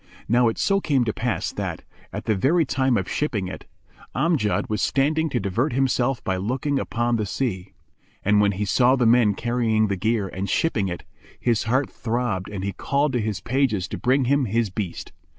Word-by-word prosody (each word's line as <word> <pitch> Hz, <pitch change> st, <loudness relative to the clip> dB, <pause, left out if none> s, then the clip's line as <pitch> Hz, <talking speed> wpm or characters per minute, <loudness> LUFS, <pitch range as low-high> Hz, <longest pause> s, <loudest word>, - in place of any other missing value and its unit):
Now 120 Hz, +1 st, +4 dB
it 115 Hz, -, -1 dB
so 195 Hz, 0 st, +2 dB
came 135 Hz, -8 st, +1 dB
to 110 Hz, -, -1 dB
pass 120 Hz, 0 st, -2 dB
that, -, -, -4 dB, 0.3 s
at -, -, -6 dB
the 110 Hz, -, +2 dB
very 150 Hz, -, +2 dB
time 130 Hz, -2 st, +1 dB
of 95 Hz, -, -2 dB
shipping 110 Hz, -11 st, -1 dB
it, 90 Hz, -, -8 dB, 0.5 s
Amjad 155 Hz, -11 st, +1 dB
was 105 Hz, -, -2 dB
standing 155 Hz, +4 st, +1 dB
to 125 Hz, -, -1 dB
divert 105 Hz, +9 st, -1 dB
himself 130 Hz, -1 st, +1 dB
by 95 Hz, -, -1 dB
looking 130 Hz, +8 st, -1 dB
upon 115 Hz, +5 st, 0 dB
the 105 Hz, -, -1 dB
sea; 95 Hz, -4 st, -3 dB, 0.5 s
and 105 Hz, +1 st, +4 dB
when 100 Hz, -1 st, +3 dB
he 100 Hz, +3 st, -2 dB
saw 125 Hz, +5 st, +4 dB
the 125 Hz, -3 st, +1 dB
men 115 Hz, -3 st, +4 dB
carrying 115 Hz, -2 st, +1 dB
the 100 Hz, -, 0 dB
gear 105 Hz, +1 st, 0 dB
and 95 Hz, +1 st, -4 dB
shipping 110 Hz, -, +1 dB
it, 85 Hz, -1 st, -5 dB, 0.4 s
his 115 Hz, -3 st, +1 dB
heart 130 Hz, +4 st, +1 dB
throbbed 115 Hz, -6 st, -2 dB
and 100 Hz, -2 st, -5 dB
he 100 Hz, -, -1 dB
called 140 Hz, 0 st, 0 dB
to 120 Hz, -, +1 dB
his 105 Hz, -3 st, -3 dB
pages 120 Hz, -6 st, 0 dB
to -, -, -4 dB
bring 130 Hz, +1 st, +2 dB
him 140 Hz, +1 st, +2 dB
his 115 Hz, -1 st, 0 dB
beast. 95 Hz, -3 st, -5 dB
115 Hz, 200 wpm, -23 LUFS, 100-130 Hz, 0.5 s, Now